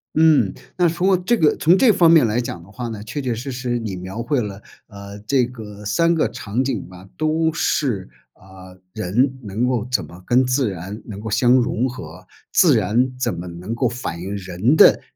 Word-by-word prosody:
嗯， 155 -11 +4 0.2
那 180 -1 +4
通 175 +3 -1
过 190 -1 +4
这 205 +7 +1
个 155 -7 +3
从 170 +4 +4
这 240 +2 +5
方 170 -5 +4
面 160 -6 +6
来 110 +2 0
讲 85 -8 -6
的 95 - -17
话 120 +2 -5
呢， 110 -3 -6
确 110 +7 -5
确 125 -3 -2
实 130 +5 -6
实 125 -1 -2
你 110 -5 -4
描 95 +5 -6
绘 140 0 0
了， 105 -2 -6 0.3
呃， 100 -1 -10
这 130 -1 +3
个 105 -4 -10
3 165 +11 +2
个 160 - +2
场 115 +5 -3
景 130 -5 -3
吧， 90 +1 -13
都 160 +1 +1
是， 110 -14 -1 0.2
啊， 95 -1 -15 0.2
人 120 +8 0
能 110 +4 -1
够 120 -3 -1
怎 130 - +1
么 85 +4 -14
跟 125 +5 +3
自 125 -1 +1
然 95 +4 -7
能 100 -3 -8
够 110 +1 -6
相 120 +3 +2
融 125 -1 +2
合， 90 -7 -10 0.3
自 - - +5
然 125 +5 +1
怎 130 - 0
么 85 - -6
能 90 +6 -6
够 125 +2 +1
反 120 -8 -5
映 95 +3 -4
人 95 - 0
的 - - +6
115 Hz, 220 characters per minute, -20 LUFS, 100-130 Hz, 0.3 s, 面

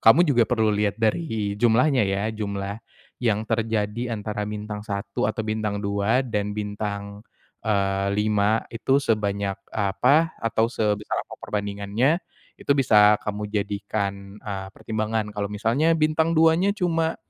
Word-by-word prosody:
kamu 115 +10 +7
juga 130 -8 +3
perlu 110 -3 +2
lihat 105 0 0
dari 110 -3 -1
jumlahnya, 125 +2 +4
ya. 95 +1 0
Jumlah 100 -1 -4 0.4
yang 110 -3 +1
terjadi 115 +1 -1
antara 105 -1 -3
bintang 105 0 -5
1 100 -1 -3
atau 110 - -3
bintang 110 -1 -2
2 100 +4 +1
dan 105 -4 -2
bintang, 105 0 -5 0.4
eee, 100 -2 +1
5, 105 +1 +2
itu 125 +4 +1
sebanyak 100 -5 0 0.2
apa 125 +11 +2
atau 115 0 0
sebesar 105 -3 -1
apa - - -15
perbandingannya. 105 - 0 0.4
Itu - - +2
bisa 105 -5 +6
kamu 105 0 -3
jadikan, 100 -1 -3
eee, 100 -2 -6
pertimbangan. 110 +1 -3
Kalau 100 -1 -3
misalnya 115 +11 +1
bintang 160 +1 +2
2-nya 165 +5 +4
cuma 165 -4 0
105 Hz, 130 wpm, -24 LUFS, 100-115 Hz, 0.4 s, kamu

